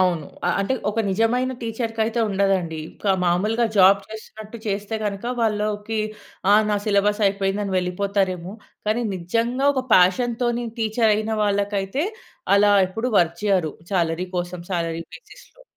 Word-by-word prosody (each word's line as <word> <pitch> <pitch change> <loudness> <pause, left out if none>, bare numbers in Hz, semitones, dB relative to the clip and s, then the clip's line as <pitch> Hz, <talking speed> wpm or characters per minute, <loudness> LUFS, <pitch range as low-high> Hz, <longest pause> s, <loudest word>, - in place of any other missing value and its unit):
అవును. 175 -5 +1 0.2
అ - - +2
అంటే 200 +7 0 0.2
ఒక 220 +2 -1
నిజమైన 230 +6 +1
టీచర్‌కైతే 225 0 -2
ఉండదండి. 190 -5 0 0.2
ఒక 200 - +2
మాములుగా 210 +7 +2
జాబ్ 195 +1 +7
చేస్తున్నట్టు 220 +1 -10
చేస్తే 205 +1 -2
గనక 200 0 -3 0.2
వాళ్ళకి 215 0 -1 0.5
ఆహ్, 215 +1 +5
నా 210 - +2
సిలబసయిపోయిందని 200 -1 +1
వెళ్ళిపోతారేమో 185 0 -1 0.3
కానీ 220 +3 +1
నిజంగా 230 +9 -1
ఒక 260 - 0
ఫ్యాషన్‌తోని 240 +6 +3
టీచరయిన 220 -1 +1
వాళ్ళకైతే 200 - 0 0.5
అలా 205 +1 +5
ఎప్పుడు 225 +7 -3
వర్క్ 170 -1 +2
చేయరు 185 -7 +1 0.2
శాలరీ 170 -1 0
కోసం, 175 0 -4
శాలరీ 165 -2 -2
బేసిస్‌లో. 165 - -15
205 Hz, 120 wpm, -22 LUFS, 185-225 Hz, 0.5 s, జాబ్